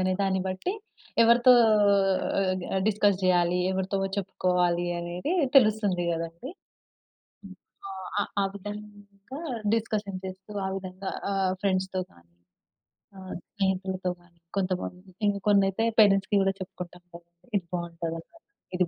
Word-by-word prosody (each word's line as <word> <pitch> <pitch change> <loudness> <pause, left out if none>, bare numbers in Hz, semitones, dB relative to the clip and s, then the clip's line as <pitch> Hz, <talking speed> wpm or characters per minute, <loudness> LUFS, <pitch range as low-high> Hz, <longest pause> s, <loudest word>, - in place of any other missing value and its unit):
అనే 185 0 +1
దాన్ని 190 -1 +1
బట్టి 185 - -2 0.5
ఎవరితో 235 +2 +7 0.9
ఆహ్, 190 -1 +2 0.3
డిస్కస్ 205 -2 +3
జేయాలి? 180 -1 +3
ఎవరితో 190 +1 -1 0.2
చెప్పుకోవాలి? 180 -2 +1
అనేది 175 - -3 0.2
తెలుస్తుంది 210 -7 +4
గదండీ. 165 - -5 0.9
హ్మ్. 195 -1 -10 0.3
ఆ! - - -7 0.3
ఆ - - +3 0.2
ఆ - - +2
విధంగా 205 +4 -9 0.3
డిస్కషన్ 210 -4 -2
చేస్తూ, 190 +2 -9
ఆ - - -1
విధంగా 190 0 -6 0.2
ఆహ్, 190 -1 +1
ఫ్రెండ్స్‌తో 190 -1 0
కానీ, 85 0 -24 0.8
ఆహ్, 190 -1 -7 0.2
స్నేహితులతో 190 -2 -1
కానీ, 175 -1 -26 0.2
కొంతమంది 185 +2 -2
కొన్నయితే 200 +2 +3 0.2
పేరెంట్స్‌కి 195 0 +4
గూడా 195 0 +2
చెప్పుకుంటాం 180 -2 -8
కదా! 170 0 -13 0.3
ఇది 185 - -4
బావుంటదంటా, 170 - -5 0.4
ఇది 180 -1 +2
190 Hz, 115 wpm, -27 LUFS, 180-200 Hz, 0.9 s, ఎవరితో